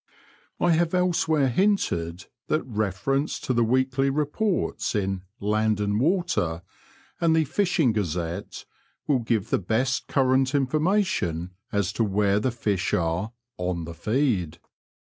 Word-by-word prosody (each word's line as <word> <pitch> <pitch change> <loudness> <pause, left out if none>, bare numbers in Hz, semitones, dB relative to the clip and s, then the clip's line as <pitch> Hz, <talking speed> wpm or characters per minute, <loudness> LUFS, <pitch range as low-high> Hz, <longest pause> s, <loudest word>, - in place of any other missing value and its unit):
I 175 - +3
have 165 +2 +2
elsewhere 160 -5 +2
hinted 95 - 0 0.2
that 155 - +1
reference 110 - -1
to 130 - -1
the 120 -1 +3
weekly 130 +3 +1
reports 150 - -1
in 95 -2 -1 0.2
Land 110 +1 +1
and 105 0 0
Water 150 - 0 0.6
and 165 -1 +3
the 160 - +4
Fishing 170 - +2
Gazette 90 -2 -3 0.4
will 140 -4 +2
give 115 -3 -1
the - - +3
best 115 +7 0
current 130 0 +2
information 145 - 0 0.2
as 100 -3 0
to 115 - +1
where 100 -1 +2
the 130 - 0
fish 105 -6 -1
are 85 +7 -1 0.3
on 90 -1 -2
the 85 - -7
feed." 105 - 0
120 Hz, 130 wpm, -25 LUFS, 95-150 Hz, 0.6 s, the